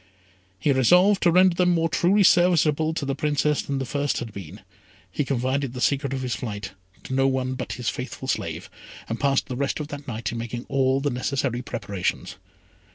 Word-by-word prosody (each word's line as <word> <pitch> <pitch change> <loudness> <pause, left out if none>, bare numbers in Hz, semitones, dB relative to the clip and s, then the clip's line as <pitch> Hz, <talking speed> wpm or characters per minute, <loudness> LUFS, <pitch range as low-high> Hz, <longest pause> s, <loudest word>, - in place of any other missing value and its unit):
He 145 - +1
resolved 180 - +4
to 175 - +4
render 185 +1 +5
them 180 0 +2
more 165 0 +2
truly 180 +5 +3
serviceable 160 -4 +4
to 145 - -2
the 135 - -1
Princess 150 +1 +1
than 140 - -3
the 135 - -2
first 145 +2 -1
had 115 -3 -5
been. 95 +1 -9 0.5
He 145 - -1
confided 130 0 -1
the 125 - -6
secret 140 +1 +1
of 135 -1 -3
his 125 -2 -2
flight 105 -3 -5 0.3
to - - -6
no 135 0 +3
one 130 -1 -1
but 130 - -5
his 125 -2 -6
faithful 130 +1 -4
slave, - - -3 0.4
and 115 - -4
passed 140 -1 +2
the 130 - -5
rest 140 +3 -1
of 150 -1 -5
the 145 -1 -7
night 115 -1 -3
in 115 - -4
making 120 +1 -5
all 135 0 +2
the 145 0 0
necessary 125 0 -1
preparations. 100 -6 -4
135 Hz, 200 wpm, -24 LUFS, 125-150 Hz, 0.5 s, render